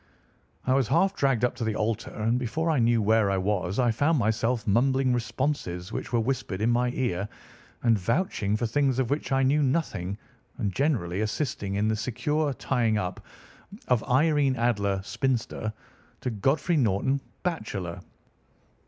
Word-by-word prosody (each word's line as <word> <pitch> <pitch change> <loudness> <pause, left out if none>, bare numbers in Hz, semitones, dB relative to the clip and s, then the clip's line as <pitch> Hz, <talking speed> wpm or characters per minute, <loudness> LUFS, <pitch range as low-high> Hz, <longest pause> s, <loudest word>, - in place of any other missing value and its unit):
"I 130 - +3
was 135 -3 +2
half 195 - +3
dragged 135 -4 +2
up 125 - 0
to 120 - -3
the 110 -1 -1
altar, 110 +1 -1
and 115 +3 0
before 160 +7 -1
I 150 - +2
knew 115 -1 +3
where 110 -1 +3
I 95 - +1
was 95 -1 -1
I 125 -2 +3
found 145 +8 +2
myself 115 +1 0
mumbling 130 +4 +2
responses 115 -6 -2
which - - -5
were 120 - +2
whispered 115 -5 -2
in 110 +3 +2
my 125 +1 +2
ear, 105 -6 -1 0.5
and 115 -3 +4
vouching 105 - 0
for 120 - -1
things 135 +2 +1
of 130 -2 0
which 145 0 -2
I 135 0 +3
knew 145 +3 +3
nothing, 130 - -1 0.4
and 100 -3 -2
generally 105 - 0
assisting 110 -3 -2
in 105 +2 +1
the 110 - +1
secure 140 +7 -1
tying 115 -3 0
up 90 -2 -4 0.7
of 125 -3 +3
Irene 140 0 +3
Adler, 105 -5 +1
spinster, 120 -2 -2 0.5
to 125 - -2
Godfrey 140 - +1
Norton, 130 +3 +1 0.2
bachelor. 105 - -3
120 Hz, 160 wpm, -27 LUFS, 105-135 Hz, 0.7 s, and